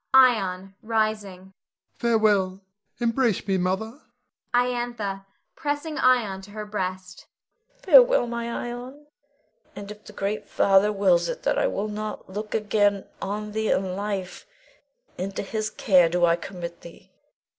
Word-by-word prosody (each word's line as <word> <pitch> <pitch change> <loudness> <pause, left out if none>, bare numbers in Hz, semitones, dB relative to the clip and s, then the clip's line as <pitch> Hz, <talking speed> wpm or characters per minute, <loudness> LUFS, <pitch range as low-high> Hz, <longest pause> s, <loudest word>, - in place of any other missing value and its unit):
Ion 195 -7 +4
[rising]. 215 -4 -2 0.4
Farewell! 210 -5 +2 0.4
Embrace 235 -3 +1
me, 190 -1 +1
Mother. 220 - -2 0.5
Iantha 240 -5 -1 0.3
[pressing 295 +1 -3
Ion 225 -7 +2
to 195 - -13
her 210 +1 -6
breast]. 185 -3 -5 0.6
Farewell, - - +7
my 235 0 -4
Ion. 245 +5 -6 0.7
And 200 0 -8
if 210 0 -12
the 210 - -12
great 200 +1 -3
Father 195 +1 +4
wills 180 -4 +2
it - - -5
that - - +1
I - - +2
look 210 +2 -3
not 210 0 -5
again 205 -2 +1 0.2
on 210 +2 -4
thee 220 0 -1
in 185 -1 0
life, 200 - -4 0.7
into 195 +2 -3
His 215 +2 -3
care 180 -6 +4
do 175 +1 +3
I 170 0 +4
commit 170 -1 -8
thee. 170 - -14
210 Hz, 130 wpm, -25 LUFS, 190-230 Hz, 0.7 s, Farewell